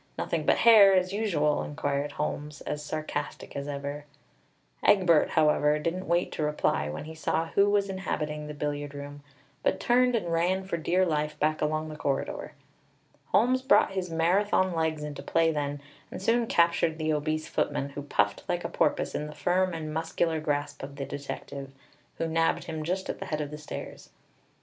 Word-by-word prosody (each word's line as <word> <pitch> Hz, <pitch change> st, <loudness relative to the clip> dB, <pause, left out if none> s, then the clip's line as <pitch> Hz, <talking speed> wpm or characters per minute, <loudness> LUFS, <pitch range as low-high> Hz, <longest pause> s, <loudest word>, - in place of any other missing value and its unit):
Nothing -, -, -2 dB
but -, -, +5 dB
hair, 210 Hz, -4 st, +8 dB
as 185 Hz, +1 st, +1 dB
usual!" 165 Hz, -9 st, +1 dB
inquired 145 Hz, -1 st, -2 dB
Holmes, 150 Hz, 0 st, -4 dB
as 150 Hz, 0 st, -4 dB
sarcastic 155 Hz, +1 st, -5 dB
as 140 Hz, 0 st, -4 dB
ever. 145 Hz, +1 st, -5 dB, 0.8 s
Egbert, 180 Hz, -6 st, +5 dB
however, 150 Hz, -1 st, +4 dB
didn't 170 Hz, +5 st, -3 dB
wait 170 Hz, +1 st, +1 dB
to -, -, -4 dB
reply 150 Hz, -, 0 dB
when 75 Hz, -, -5 dB
he 160 Hz, -, -8 dB
saw 160 Hz, +1 st, -1 dB
who 200 Hz, +3 st, +3 dB
was 205 Hz, -1 st, +2 dB
inhabiting 150 Hz, -6 st, -3 dB
the 150 Hz, -, -7 dB
billiard 145 Hz, -1 st, -3 dB
room; 145 Hz, 0 st, -8 dB, 0.4 s
but -, -, +1 dB
turned 250 Hz, 0 st, +3 dB
and 175 Hz, -7 st, -1 dB
ran 180 Hz, +3 st, +1 dB
for 190 Hz, -2 st, -3 dB
dear 180 Hz, +3 st, +2 dB
life 150 Hz, -2 st, -1 dB
back 155 Hz, +1 st, +1 dB
along 155 Hz, +1 st, 0 dB
the 155 Hz, -, -7 dB
corridor. 140 Hz, -2 st, -3 dB, 0.7 s
Holmes 255 Hz, +4 st, +3 dB
brought 265 Hz, -5 st, +4 dB
his 190 Hz, -2 st, -3 dB
Marathon 185 Hz, +3 st, +2 dB
legs 160 Hz, -2 st, -1 dB
into 150 Hz, -1 st, -6 dB
play 165 Hz, 0 st, +2 dB
then, 145 Hz, -1 st, -2 dB, 0.3 s
and -, -, -7 dB
soon 230 Hz, +4 st, +2 dB
captured 170 Hz, -3 st, +2 dB
the 155 Hz, -1 st, 0 dB
obese 155 Hz, +1 st, -1 dB
footman, 140 Hz, -1 st, -1 dB
who 140 Hz, +1 st, -6 dB
puffed 105 Hz, -8 st, 0 dB
like -, -, -1 dB
a -, -, -3 dB
porpoise -, -, 0 dB
in 150 Hz, -, -3 dB
the 150 Hz, -, -9 dB
firm 185 Hz, +1 st, +1 dB
and 155 Hz, -2 st, -5 dB
muscular 160 Hz, 0 st, 0 dB
grasp 145 Hz, -1 st, -2 dB
of 140 Hz, +1 st, -7 dB
the 140 Hz, -1 st, -4 dB
detective, 140 Hz, -1 st, -7 dB, 0.4 s
who 165 Hz, -, -1 dB
nabbed 165 Hz, 0 st, +1 dB
him 160 Hz, -2 st, -5 dB
just 185 Hz, +4 st, -2 dB
at -, -, -4 dB
the -, -, -5 dB
head 155 Hz, -, -2 dB
of 150 Hz, -1 st, -4 dB
the 150 Hz, -, -6 dB
stairs. 150 Hz, -, -8 dB
155 Hz, 185 wpm, -28 LUFS, 150-180 Hz, 0.8 s, hair